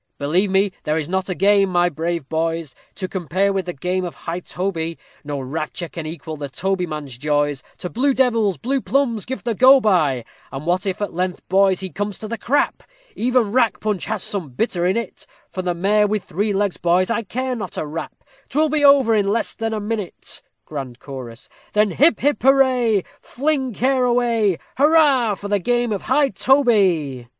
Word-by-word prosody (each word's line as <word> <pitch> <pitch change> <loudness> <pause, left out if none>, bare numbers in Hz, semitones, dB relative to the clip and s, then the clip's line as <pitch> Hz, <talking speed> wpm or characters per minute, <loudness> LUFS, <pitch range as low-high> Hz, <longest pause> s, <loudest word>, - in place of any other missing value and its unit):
_ - - -52
Believe 170 +8 +1
me, 195 +1 +2
there 155 0 -1
is 155 -2 -2
not 190 +2 -2
a 185 - -1
game, 195 +1 +4
my 175 -1 +3
brave 165 -2 -3
boys, 165 -2 -2 0.2
To 185 - -4
compare 190 +2 0
with 190 -2 -2
the 175 - -3
game 180 +5 -2
of 175 -5 -5
high 165 +5 -5
toby; 170 -3 -3 0.3
No 145 -1 -4
rapture 155 +6 -4
can 165 -2 -6
equal 160 -1 -7
the 145 -1 -5
tobyman's 155 -4 -3
joys, 145 -1 0 0.2
To - - -5
blue 265 +8 +1
devils, 225 - +2
blue 270 - -1
plumbs 240 -7 0
give 260 +1 -5
the 235 -1 -1
go 260 +5 +7
by; 155 - +2 0.3
And 135 +3 -6
what 180 +4 0
if, 195 +2 -2
at 205 - -4
length, 180 +1 -3
boys, 190 -1 +3
he 190 -1 -4
come 205 0 -2
to 215 - -7
the 230 0 -5
crap! 280 +4 0 0.3
Even 245 -3 +1
rack 240 -1 +2
punch 210 -3 -2
has 215 -2 -2
some 185 -8 -4
bitter 175 - -1
in 190 +4 +1
it, 235 -4 -6 0.2
For 185 - -3
the 180 -1 -2
mare 210 +4 +2
with 210 -2 -1
three 205 +6 -1
legs, 200 -1 0
boys, 180 +4 +2
I 230 - 0
care 255 +4 -3
not 220 - -6
a - - -2
rap, 155 +2 -7 0.3
'Twill 310 +3 +2
be 300 0 +1
over 280 -5 +6
in 205 -2 +2
less 220 +3 0
than 225 -1 -3
a 220 - -2
minute. 210 -2 -5 0.2
GRAND 135 -5 -6
CHORUS 130 -3 -9 0.3
_Then 210 -2 +3
hip, 305 - +4 0.2
hurrah! 255 -5 +4 0.2
Fling 275 -1 -1
care 260 +3 +2
away! 235 -6 +2 0.2
Hurrah 285 -7 +4
for 200 - -7
the 205 0 +1
game 240 +3 0
of 200 - -2
high 290 -2 +3
toby! 195 - +2
195 Hz, 195 wpm, -21 LUFS, 170-235 Hz, 0.3 s, go